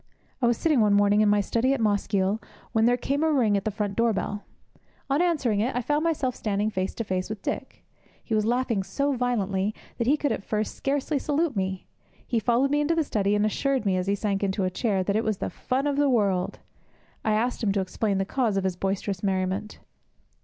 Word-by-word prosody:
I 240 Hz, -, +4 dB
was 235 Hz, -1 st, +2 dB
sitting 310 Hz, -6 st, +2 dB
one 210 Hz, -2 st, +4 dB
morning 205 Hz, +1 st, +4 dB
in 210 Hz, -, +4 dB
my 205 Hz, 0 st, +4 dB
study 235 Hz, +6 st, +1 dB
at -, -, -4 dB
Mosgiel, 205 Hz, -1 st, +1 dB, 0.3 s
when 225 Hz, -1 st, +3 dB
there 245 Hz, +1 st, +4 dB
came 280 Hz, +4 st, -1 dB
a 320 Hz, -, +3 dB
ring 235 Hz, -8 st, +3 dB
at 200 Hz, -, -1 dB
the -, -, +2 dB
front 205 Hz, -1 st, -3 dB
door 230 Hz, 0 st, +2 dB
bell. 205 Hz, +1 st, -3 dB, 0.7 s
On 285 Hz, +4 st, +3 dB
answering 285 Hz, -12 st, +1 dB
it, 240 Hz, +5 st, 0 dB
I 245 Hz, -, -1 dB
found 295 Hz, +5 st, +1 dB
myself 295 Hz, -7 st, 0 dB
standing 210 Hz, 0 st, -1 dB
face 185 Hz, -1 st, -2 dB
to 230 Hz, -, -2 dB
face 185 Hz, -2 st, -2 dB
with 215 Hz, -2 st, -6 dB
Dick. -, -, -5 dB, 0.4 s
He 225 Hz, -, -4 dB
was 215 Hz, -1 st, +3 dB
laughing 235 Hz, -2 st, +1 dB
so 280 Hz, +9 st, -1 dB
violently 210 Hz, -5 st, 0 dB, 0.2 s
that 235 Hz, -, 0 dB
he 290 Hz, +4 st, +4 dB
could 290 Hz, -1 st, 0 dB
at -, -, -2 dB
first 215 Hz, +1 st, -2 dB
scarcely 280 Hz, +1 st, -1 dB
salute 295 Hz, +1 st, 0 dB
me. 190 Hz, -1 st, -2 dB, 0.4 s
He 235 Hz, -, 0 dB
followed 240 Hz, +5 st, +2 dB
me 295 Hz, 0 st, +2 dB
into 315 Hz, +3 st, +1 dB
the 325 Hz, -, +2 dB
study, 205 Hz, -6 st, 0 dB
and 210 Hz, 0 st, +2 dB
assured 265 Hz, +3 st, 0 dB
me 190 Hz, -2 st, +2 dB
as 185 Hz, 0 st, -1 dB
he 200 Hz, -, +2 dB
sank 200 Hz, -1 st, -1 dB
into 195 Hz, 0 st, 0 dB
a 185 Hz, -, 0 dB
chair 195 Hz, -1 st, 0 dB
that 200 Hz, +2 st, -1 dB
it 220 Hz, -, +2 dB
was 215 Hz, -3 st, 0 dB
the -, -, -3 dB
fun 265 Hz, +2 st, -2 dB
of 285 Hz, -1 st, 0 dB
the 290 Hz, -1 st, +3 dB
world. 200 Hz, -7 st, +1 dB, 0.7 s
I 215 Hz, -, +1 dB
asked 235 Hz, +4 st, 0 dB
him 210 Hz, -4 st, +2 dB
to 200 Hz, -, +1 dB
explain 195 Hz, +2 st, -1 dB
the 195 Hz, -, 0 dB
cause 225 Hz, -2 st, 0 dB
of 195 Hz, -, 0 dB
his 190 Hz, -2 st, -1 dB
boisterous 195 Hz, 0 st, -2 dB
merriment. 190 Hz, +1 st, -1 dB
215 Hz, 230 wpm, -26 LUFS, 200-255 Hz, 0.7 s, I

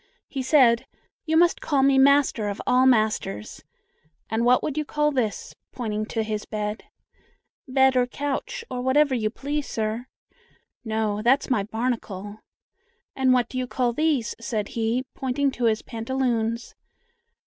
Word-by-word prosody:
He 270 Hz, -, -4 dB
said: 255 Hz, -3 st, +4 dB, 0.4 s
"You 320 Hz, +1 st, +2 dB
must 345 Hz, +1 st, +3 dB
call 280 Hz, -3 st, +1 dB
me 270 Hz, 0 st, +4 dB
'Master 270 Hz, -6 st, +4 dB
of 200 Hz, -, -5 dB
all 255 Hz, +1 st, +4 dB
Masters.' 215 Hz, -, 0 dB, 0.7 s
And 225 Hz, +1 st, +1 dB
what 250 Hz, +1 st, +4 dB
would 295 Hz, -, -2 dB
you 305 Hz, -, 0 dB
call 300 Hz, 0 st, 0 dB
this?" 240 Hz, -7 st, -2 dB, 0.2 s
pointing 215 Hz, -3 st, -3 dB
to 225 Hz, -1 st, -2 dB
his 215 Hz, -1 st, -3 dB
bed. 210 Hz, 0 st, -4 dB, 0.8 s
"Bed 265 Hz, 0 st, +3 dB
or 250 Hz, -1 st, +3 dB
couch, 290 Hz, -, -4 dB
or 250 Hz, -, -3 dB
whatever 270 Hz, +2 st, +3 dB
you 220 Hz, -4 st, 0 dB
please, 285 Hz, +5 st, -4 dB
sir." 220 Hz, +3 st, -3 dB, 0.8 s
"No, 220 Hz, -2 st, -1 dB
that's 265 Hz, +5 st, +2 dB
my 220 Hz, -, +3 dB
'barnacle.' 215 Hz, -2 st, -4 dB, 0.8 s
And 260 Hz, -1 st, +3 dB
what 250 Hz, -2 st, +3 dB
do 255 Hz, -, -4 dB
you 255 Hz, -, -2 dB
call 245 Hz, -1 st, 0 dB
these?" 295 Hz, -4 st, 0 dB
said 220 Hz, -3 st, -3 dB
he, 230 Hz, +3 st, -1 dB
pointing 270 Hz, +1 st, -1 dB
to 245 Hz, -2 st, -2 dB
his 220 Hz, -1 st, +1 dB
pantaloons. 230 Hz, -1 st, -2 dB
245 Hz, 150 wpm, -24 LUFS, 220-270 Hz, 0.8 s, said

